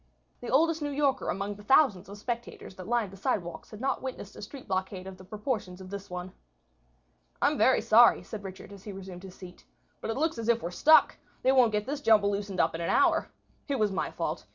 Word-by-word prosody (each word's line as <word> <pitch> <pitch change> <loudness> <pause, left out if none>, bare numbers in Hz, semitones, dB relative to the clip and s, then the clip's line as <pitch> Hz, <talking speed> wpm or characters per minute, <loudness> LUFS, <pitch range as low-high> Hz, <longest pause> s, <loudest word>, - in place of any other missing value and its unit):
The 245 - -7
oldest 320 +5 +3
New 295 - -1
Yorker 280 -1 0
among 200 +2 -2
the 205 +1 -13
thousands 205 -7 +3
of 200 - -9
spectators 235 -1 -6
that 185 -1 -9
lined 235 -4 0
the 195 - -12
sidewalks 175 -3 -3
had 215 - -10
not 270 +3 -1
witnessed 255 -6 -7
a - - -10
street 245 +6 -10
blockade 190 -1 -3
of 190 0 -8
the 185 - -14
proportions 210 -2 -4
of 185 0 -10
this 200 0 -7
one. 180 0 -6 1.1
"I'm - - +2
very - - +4
sorry," 90 - +6
said 205 - -8
Richard, 190 +1 -9
as 195 -1 -13
he 210 - -7
resumed 190 -2 -9
his 190 -1 -11
seat, 180 -1 -12 0.4
"but - - -5
it 225 - -2
looks 315 -3 0
as 230 0 -3
if 235 0 +2
we 170 - -2
are - - -11
stuck. 310 - +5 0.3
They 260 - +5
won't 255 -4 +5
get 210 0 -1
this 285 +3 -4
jumble 210 -5 +4
loosened 200 -1 -4
up 165 0 +3
in 165 - -4
an 170 - -2
hour. 340 -3 +3 0.4
It 280 -2 -1
was 215 -3 +1
my 190 - -2
fault. - - -4
205 Hz, 235 wpm, -29 LUFS, 190-255 Hz, 1.1 s, sorry